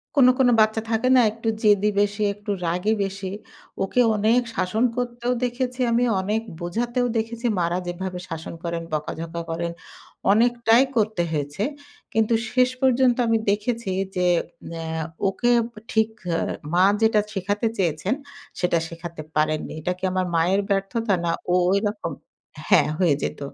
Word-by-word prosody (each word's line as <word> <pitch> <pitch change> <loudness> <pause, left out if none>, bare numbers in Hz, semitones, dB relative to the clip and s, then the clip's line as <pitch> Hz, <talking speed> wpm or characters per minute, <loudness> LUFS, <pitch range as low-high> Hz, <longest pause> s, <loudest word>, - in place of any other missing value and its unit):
কোনো, 255 -3 +7
কোনো 245 -2 +5
বাচ্চা 220 +1 +2
থাকে 225 +3 +1
না, 250 - +7
একটু 225 +1 -7 0.2
জেদি 205 -1 +4
বেশি, 205 +1 -1
একটু 205 0 -6
রাগী 180 +6 +1
বেশি? 195 0 -4 0.6
ওকে 195 +6 -1 0.2
অনেক 220 +4 +3
শাসন 215 +6 0
করতেও 245 0 -1
দেখেছি 250 +1 -2
আমি, 235 +1 +3 0.2
অনেক 210 +4 -1 0.2
বোঝাতেও 240 +8 -1
দেখেছি, 230 +2 -3
মা'রা 170 +1 0
যেভাবে 180 +1 -4
শাসন 160 0 -6
করেন, 170 -1 -2
বকাঝকা 165 +2 -4
করেন, 170 +1 -2 0.6
অনেকটাই 235 +2 +4
করতে 215 -4 +1
হয়েছে। 145 +4 -2 0.5
কিন্তু 225 +1 +2 0.2
শেষ 250 0 +4
পর্যন্ত 255 -2 +4
আমি 225 - +3
দেখেছি 210 +1 -1 0.3
যে, 180 - 0 0.5
অ্যা 160 -1 -3 0.2
ওকে 215 +5 0 0.4
ঠিক 220 0 +2 0.2
অ্যা 165 - +1 0.3
মা 180 - +5 0.2
যেটা 220 -1 +4
শিখাতে 205 +3 -1
চেয়েছেন? 175 +3 0 0.5
সেটা 180 -2 +2
শেখাতে 170 -1 -8
পারেননি। 155 0 0
এটা 175 +4 -2
কি 185 - -25
আমার 185 0 0
মায়ের 180 +5 +3
ব্যর্থতা 200 +2 0
না 170 - 0 0.2
ও - - +3 0.2
ঐরকম? 205 +2 0 0.6
হ্যাঁ, - - +5
হয়ে 170 -7 +4
যেত। - - -3
205 Hz, 145 wpm, -23 LUFS, 175-230 Hz, 0.6 s, কোনো